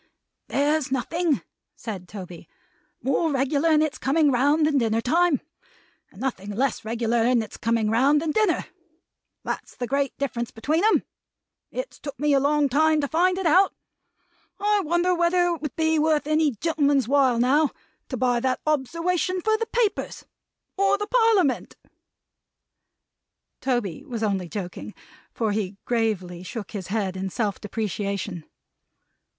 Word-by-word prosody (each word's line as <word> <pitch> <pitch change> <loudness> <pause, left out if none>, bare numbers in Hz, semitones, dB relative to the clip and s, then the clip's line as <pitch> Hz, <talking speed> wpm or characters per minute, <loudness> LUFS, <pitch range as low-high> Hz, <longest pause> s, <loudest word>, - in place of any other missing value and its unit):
"There's 290 0 +1
nothing," 315 +4 0 0.3
said 195 -6 -7
Toby, 180 -4 -9 0.5
"more 275 +5 +1
regular 280 +4 +1
in 310 -1 +4
its 310 - -3
coming 290 +1 +3
round 285 +5 +3
than 295 -2 +2
dinner 225 -2 +1
time, 325 +5 +2 0.7
and 190 - -17
nothing 225 -6 -3
less 235 +4 -1
regular 230 +1 0
in 240 -1 +3
its 215 - -10
coming 225 -1 0
round 270 +6 +4
than 315 0 -1
dinner. 420 -2 +1 0.8
That's - - -5
the 245 - -3
great 275 +1 -1
difference 240 -4 -2
between 305 - -1
'em. 440 - +4 0.7
It's - - -6
took 285 -4 -8
me 295 0 +2
a 275 - +5
long 290 +1 +2
time 310 +3 +3
to 285 - -1
find 360 +5 +2
it 385 - -3
out. 365 +5 +4 0.8
I 415 +1 +2
wonder 345 +3 +2
whether 345 +1 +2
it 340 -2 -3
would 300 -4 -5
be 320 -1 +2
worth 305 -1 +2
any 310 0 +2
gentleman's 285 -1 +1
while, 265 -3 +3
now, 275 +5 +3 0.4
to 255 - -3
buy 245 0 +2
that 260 +1 0
obserwation 335 +5 0
for 435 +4 +2
the 455 +1 -2
Papers; 470 -4 -1 0.5
or 395 0 +3
the 415 - -3
Parliament!" 440 - +2 1.8
Tony 240 -10 -2
was 230 -3 -5
only 195 -5 -1
joking, 190 -3 -6 0.4
for 220 -2 -1
he 205 -2 -2
gravely 205 -7 -1
shook 205 +3 -7
his 195 -4 -5
head 195 -2 -2
in 190 0 -3
self 205 0 -2
depreciation. 200 -4 -3
275 Hz, 150 wpm, -24 LUFS, 225-320 Hz, 1.8 s, a